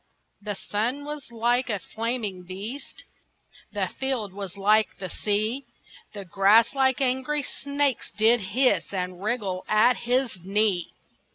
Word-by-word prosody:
The 205 0 -4
sun 235 +9 -2
was 295 -4 -7
like 240 +2 +1
a 210 - 0
flaming 220 -1 -3
beast, 200 +10 -7 0.7
The - - -1
field 255 -8 -3
was 195 -1 -7
like 210 +2 +3
the 185 - -6
sea; 215 +5 -1 0.5
The 200 -1 -6
grass 200 +6 +5
like 265 -1 +2
angry 265 +3 0
snakes 280 -1 -1
did 225 +3 +5
hiss 200 -1 +1
And 180 -1 -3
wriggle 205 -4 -1
at 220 +3 +5
his 245 -4 0
knee. 195 -2 +1
220 Hz, 130 wpm, -26 LUFS, 200-255 Hz, 0.7 s, grass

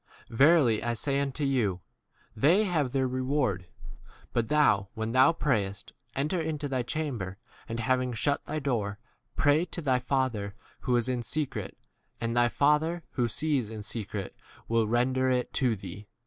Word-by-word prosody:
Verily 135 -3 +5
I 120 0 -1
say 140 +4 0
unto 140 +1 -2
you, 120 -10 +1 0.6
They 165 - +4
have 165 -8 +1
c 125 - -12
their 135 -1 +2
reward. 130 -7 -1
6 - - -16 0.2
But 120 -2 +1
thou, 130 -10 +3
when 110 0 -2
thou 130 +5 +6
prayest, 105 - -1 0.2
enter 155 +6 0
into 155 -2 -2
thy 130 -2 -1
chamber, 120 -9 -3 0.3
and 115 0 -3
hav 130 +2 +2
ing 125 -1 -2
shut 140 +5 0
thy 155 - -2
door, 115 -8 -1 0.4
pray 145 +3 +4
to 180 - -6
thy 130 -6 +2
Father 125 -6 -1 0.2
who 125 -2 0
is 120 0 +1
in 125 -2 -1
secret, 150 +4 -3 0.4
and 115 0 -2
thy 120 0 +4
Father 150 +6 +2
who 120 -3 0
sees 135 -2 0
in 110 -2 -7
secret 105 -2 -5 0.3
will 115 -1 +2
7 - - -5
render 130 +2 +2
[it] 125 -1 0
to 125 -4 +2
thee. 100 +1 -9
130 Hz, 175 wpm, -29 LUFS, 115-145 Hz, 0.6 s, thou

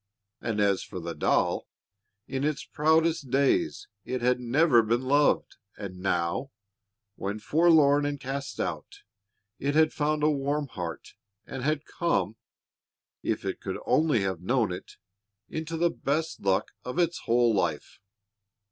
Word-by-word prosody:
And 110 -3 -2
as 100 -2 +2
for 95 - -7
the 85 0 -5
doll, - - +1 0.6
in 135 0 -3
its 150 -1 -1
proudest 160 -1 +2
days 330 - +1 0.2
it 130 - -3
had 125 0 +3
never 125 +1 +4
been 115 +3 0
loved, 145 +3 +2 0.2
and 95 -3 -7
now, 90 +6 -1 0.7
when 100 +2 -3
forlorn 150 +2 +4
and 145 0 -2
cast 140 +1 -5
out, 80 -5 -4 0.6
it 145 +2 -1
had 155 0 +4
found 150 0 0
a 155 - +5
warm 145 +1 -1
heart, 90 -7 -6 0.3
and 135 - -6
had 150 +2 0
come, 110 - 0 0.9
if - - -2
it - - -3
could - - -4
only 150 -8 +3
have 95 -3 -2
known 115 +1 +1
it, 90 - -7 0.6
into 160 +1 -4
the 170 +1 +2
best 155 +3 -2
luck 95 -1 +1
of 125 - -5
its 175 -1 +1
whole 120 0 +4
life. 100 - -1
135 Hz, 145 wpm, -28 LUFS, 105-155 Hz, 0.9 s, a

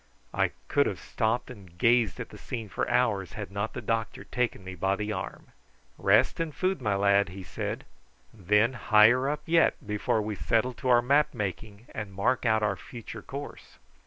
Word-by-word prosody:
I - - +2 0.2
could - - +3
have - - -3
stopped 115 +3 -1
and 95 -7 -14
gazed 115 -2 +3
at - - -5
the - - -11
scene 115 -4 -6
for - - -2
hours 105 -7 +1
had 105 -2 -6
not 100 +2 -3
the - - -6
doctor 115 -1 -2
taken 125 -6 -2
me 95 0 -7
by 95 +2 0
the 105 +1 -3
arm. 95 - -6 0.5
"Rest - - +3
and 165 -3 -2
food, 185 -5 0
my 105 -4 +1
lad," 100 -1 +3
he 95 +1 -8
said; - - -5 0.5
"and 100 -6 -18
then 105 +5 +4
higher 120 +3 +5
up 150 0 -3
yet 165 0 +4
before 105 +1 0
we 105 0 -3
settle 115 +4 0
to 130 +2 -4
our 120 -1 +5
map 145 +3 +3
making 105 +1 -5
and 105 -3 -6
mark 115 +5 +1
out 110 -1 +3
our 105 -2 +1
future 115 -1 -9
course." 140 +5 -9
110 Hz, 190 wpm, -28 LUFS, 100-125 Hz, 0.5 s, higher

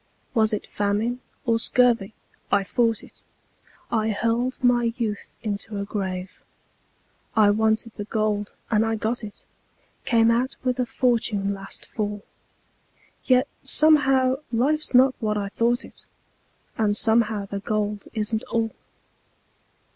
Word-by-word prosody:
Was 220 -2 +3
it 210 - -2
famine 210 +4 -1 0.3
or 230 -2 +2
scurvy 230 -4 +3 0.4
I 200 - +3
fought 230 +2 +1
it; - - -14 0.7
I 220 -1 +1
hurled 230 +4 0
my 240 -2 +3
youth 215 -4 -4
into 205 0 -3
a 200 - -3
grave. 190 -2 -4 0.9
I 210 -2 +6
wanted 220 +2 +1
the 205 - -5
gold, 210 -1 -1 0.2
and 215 -1 +4
I 225 0 0
got 220 +2 -2
it 205 -1 -9 0.6
Came 230 -1 +4
out 250 +3 0
with 255 0 0
a 250 - +1
fortune 225 -6 +1
last 195 0 -6
fall, 205 -1 -4 1.0
Yet 255 -1 +4
somehow 270 -4 +4
life's 275 +4 +1
not 260 +1 +6
what 210 -2 -1
I 200 -1 -2
thought 240 +4 0
it, - - -16 0.7
And 210 -1 +2
somehow 220 -3 +2
the 200 0 -5
gold 210 -1 -2
isn't 215 0 -1
all. 225 -1 -1
220 Hz, 130 wpm, -24 LUFS, 205-240 Hz, 1.0 s, I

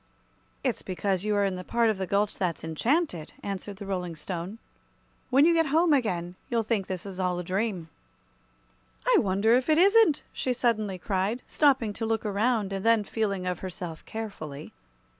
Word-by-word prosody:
"It's - - -1
because 190 +1 -2
you 210 -1 +1
are 205 0 +3
in 190 -2 -1
the 180 - -6
part 230 +2 +2
of 200 - -5
the 190 - -2
gulch 200 +2 +1
that's 175 -4 -2
enchanted," 175 - 0
answered 200 0 -5
the 200 +1 -8
Rolling 180 -3 -3
Stone. 180 +5 -5 0.7
"When 275 +3 +5
you 340 - +5
get 325 -1 +3
home 320 +3 +4
again, 180 -10 0 0.2
you'll 235 -3 +1
think 210 -3 -1
this 185 -1 -5
is 195 -2 -7
all 180 -1 0
a 180 - -3
dream." 185 -1 -2 1.2
"I - - +5
wonder 200 +3 +2
if 255 +4 +2
it 310 - +5
isn't!" 395 -3 +5
she 255 - -1
suddenly 215 -6 0
cried, 195 +6 -1
stopping 265 -8 +2
to 225 - -3
look 225 0 -1
around, 210 0 +1
and 195 0 -3
then 230 -2 +4
feeling 200 -3 -2
of 180 -2 -2
herself 180 -3 -6
carefully. 160 -10 -7
205 Hz, 180 wpm, -27 LUFS, 185-235 Hz, 1.2 s, When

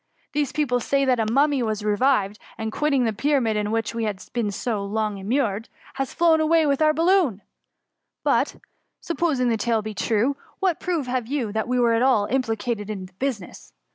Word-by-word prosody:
These 290 -2 0
people 270 -5 0
say 275 +3 +1
that 255 -2 +2
a 220 -1 0
mummy 280 +2 +3
has 215 -3 -2
revived, 210 -2 +1 0.2
and, 220 -1 -3
quitting 280 0 +1
the 225 -2 0
Pyramid 240 -1 +1
in 210 0 -1
which 225 0 -1
he 230 -1 -2
had 200 -3 -4
been 235 -4 0
so 205 0 -2
long 210 0 -2
immured, 220 0 -1 0.2
has 270 -2 -3
flown 330 -2 +3
away 320 0 +3
with 280 0 +1
our 310 0 +5
bal 320 +2 0
loon: 345 - +3 0.8
but, - - +1 0.4
supposing 310 -7 0
the 225 - +1
tale 230 +1 +1
to 215 - -4
be - - -6
true, 230 +7 0 0.2
what 375 -4 +1
proof 340 -6 -1
have 250 -2 -2
you 255 -5 -2
that 220 +2 -2
we 250 0 +1
were 235 -1 +3
at 230 - +2
all 255 -6 +3
implicated 225 -2 -2
in 195 -3 -5
the 185 - -16
business 245 - -4
240 Hz, 200 wpm, -24 LUFS, 215-280 Hz, 0.8 s, our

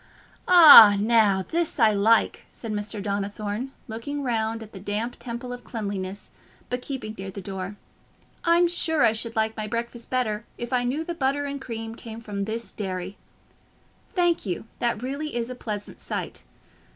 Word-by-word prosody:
"Ah, 290 - +10
now 210 -3 +3
this 335 -3 -1
I 220 -2 +6
like," 215 +3 +2
said 225 - -7
Mr. 210 0 -3
Donnithorne, 205 +4 -3 0.2
looking 270 +6 -5
round 225 -2 -1
at 215 - -13
the 190 - -8
damp 210 +5 -3
temple 245 +1 -6
of 245 - -9
cleanliness, 200 -3 -5 0.4
but 250 0 -1
keeping 245 -6 -5
near 195 0 -5
the 190 - -7
door. 190 +1 -6 0.7
"I'm 340 +1 +4
sure 320 -2 +1
I 220 - +5
should 230 +1 -2
like 220 0 0
my 215 -1 -4
breakfast 235 +1 -4
better 225 -4 -1
if 240 +1 -5
I 245 -1 +2
knew 275 +6 -1
the 345 - -4
butter 285 -2 0
and 280 -1 -5
cream 225 -3 -6
came 225 -1 -9
from 205 -3 -4
this 220 -1 -4
dairy. 185 -1 -5 1.0
Thank 350 -2 +2
you, 185 0 -4
that 235 -1 -1
really 280 +2 -4
is 240 +1 -2
a - - -3
pleasant 210 -4 -6
sight. - - -4
225 Hz, 170 wpm, -25 LUFS, 205-255 Hz, 1.0 s, Ah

